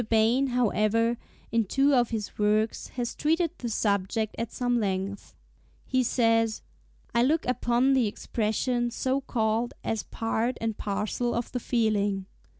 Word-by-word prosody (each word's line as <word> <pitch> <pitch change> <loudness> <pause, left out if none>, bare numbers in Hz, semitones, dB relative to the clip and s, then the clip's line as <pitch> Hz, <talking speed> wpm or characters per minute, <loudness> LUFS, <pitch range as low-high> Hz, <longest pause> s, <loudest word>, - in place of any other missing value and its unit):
Bain, 230 +5 +3
however, 230 -1 +2 0.4
in 230 -1 +2
two 275 +7 +3
of 245 -3 +3
his 215 -3 -5
works 215 +1 +1
has 240 -1 -2
treated 325 +2 +1
the 240 - -3
subject 210 0 0
at 230 -1 -3
some 245 -2 0
length. 195 -1 -3 0.5
He 260 -1 +1
says, 225 -2 +2 0.5
"I 235 - +3
look 305 +6 +2
upon 250 +1 +2
the 255 -4 +3
expression 235 +3 -1
so 260 +3 -1
called 230 -2 -1
as 225 -2 -1
part 225 +2 -2
and 225 -1 -2
parcel 210 +5 -2
of 235 0 -3
the 250 - -2
feeling. 205 -5 0
230 Hz, 145 wpm, -27 LUFS, 215-245 Hz, 0.5 s, Bain